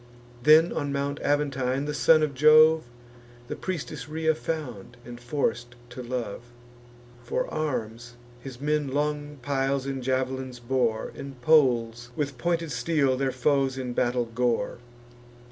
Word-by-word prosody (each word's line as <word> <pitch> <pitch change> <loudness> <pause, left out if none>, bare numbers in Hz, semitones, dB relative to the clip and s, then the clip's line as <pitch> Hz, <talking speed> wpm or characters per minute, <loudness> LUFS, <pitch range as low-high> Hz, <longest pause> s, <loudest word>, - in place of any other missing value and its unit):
Then 155 +5 +6
on 145 -2 -2
Mount 140 +1 -2
Aventine 140 -2 0
the 150 - -3
son 155 +1 +4
of 150 -2 -1
Jove 155 +2 +6 0.6
The - - -3
priestess 155 -6 -5
Rhea 160 +1 +1
found, 125 -8 -5
and 120 0 -9
forc'd 120 -2 -2 0.2
to 125 - -7
love. 120 -4 -4 0.8
For 120 - -2
arms, 120 -5 -3 0.2
his 125 -1 -10
men 150 0 0
long 145 +1 -2
piles 135 0 0
and 135 -1 -3
jav'lins 130 0 -2
bore; 120 -2 -1
And 135 -2 -9
poles 120 -6 +3
with 140 -4 -3
pointed 170 +1 -1
steel 145 -6 +1
their 135 0 0
foes 135 +1 +1
in 125 -2 -4
battle 120 0 +1
gore. 120 0 -1
135 Hz, 135 wpm, -26 LUFS, 125-150 Hz, 0.8 s, Then